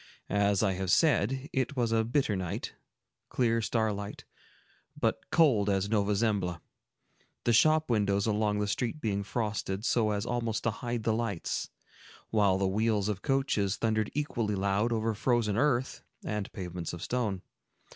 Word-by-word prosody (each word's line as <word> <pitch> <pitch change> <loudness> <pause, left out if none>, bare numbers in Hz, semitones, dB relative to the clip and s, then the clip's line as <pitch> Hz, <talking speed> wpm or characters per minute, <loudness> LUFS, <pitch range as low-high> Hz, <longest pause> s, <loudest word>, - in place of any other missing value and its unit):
As 100 0 +2
I 100 -3 +2
have 95 0 -3
said, 135 - +2
it 130 +2 -1
was 120 -3 0
a 115 0 +3
bitter 120 -2 +1
night, 95 +3 -4 0.6
clear 115 -2 +1
starlight, 105 -2 -2 0.7
but - - -1
cold 120 -11 +4
as 100 0 +1
Nova 105 -1 +2
Zembla,—the 100 +2 -4
shop 155 +6 +4
windows 100 -3 +2
along 105 -1 +1
the 105 0 0
street 120 +7 -2
being 105 -6 -1
frosted, 105 -1 -3
so 115 -4 +2
as 105 0 -1
almost 115 -3 -2
to 115 - +1
hide 120 0 -4
the 110 - +2
lights, 110 -6 -2 0.6
while 100 -4 +3
the 95 0 +1
wheels 105 +1 +1
of 100 -2 -3
coaches 135 -8 +1
thundered 110 -2 0
equally 120 -8 -1
loud 100 +4 +1
over 110 0 0
frozen 115 -2 +1
earth 130 0 +1 0.2
and 105 -2 -3
pavements 90 -3 -5
of 85 0 -6
stone. 110 -7 -2
110 Hz, 150 wpm, -30 LUFS, 100-120 Hz, 0.7 s, cold